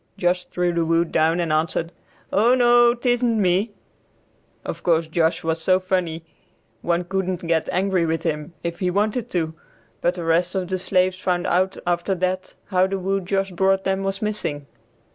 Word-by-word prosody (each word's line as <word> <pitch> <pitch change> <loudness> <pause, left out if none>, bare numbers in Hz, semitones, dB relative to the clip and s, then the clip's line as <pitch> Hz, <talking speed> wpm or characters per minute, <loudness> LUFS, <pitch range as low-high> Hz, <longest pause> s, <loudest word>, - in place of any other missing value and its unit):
Josh 180 0 0
threw 180 -1 -1
the 170 -1 +1
wood 165 +1 +1
down 165 +2 +2
and 165 -3 0
answered, 160 +1 0 0.4
"O 230 +5 +4
no, 240 -1 +5
tisn't 245 -1 +1
me." 190 +3 +2 1.0
Of - - -5
course 165 -2 +2
Josh 160 +1 0
was 160 0 -1
so 185 +2 +3
funny 180 -3 -2 0.6
one 175 +1 0
couldn't 185 -1 -2
get 165 -1 0
angry 185 -2 +1
with 160 0 -1
him 150 0 -3
if 170 0 -4
he 185 - 0
wanted 210 +5 0
to; 160 -3 -1 0.5
but 175 +1 +1
the 175 - -5
rest 170 +3 +1
of 185 -2 -2
the 185 -1 -1
slaves 185 0 +1
found 180 -1 -1
out 185 +2 +1
after 175 +2 0
that 185 +1 -2
how 185 -1 +2
the 195 0 -2
wood 195 0 -2
Josh 195 0 0
brought 190 +2 +2
them, 190 0 0
was 195 +1 -3
missing. 205 -9 -3
180 Hz, 180 wpm, -22 LUFS, 170-195 Hz, 1.0 s, no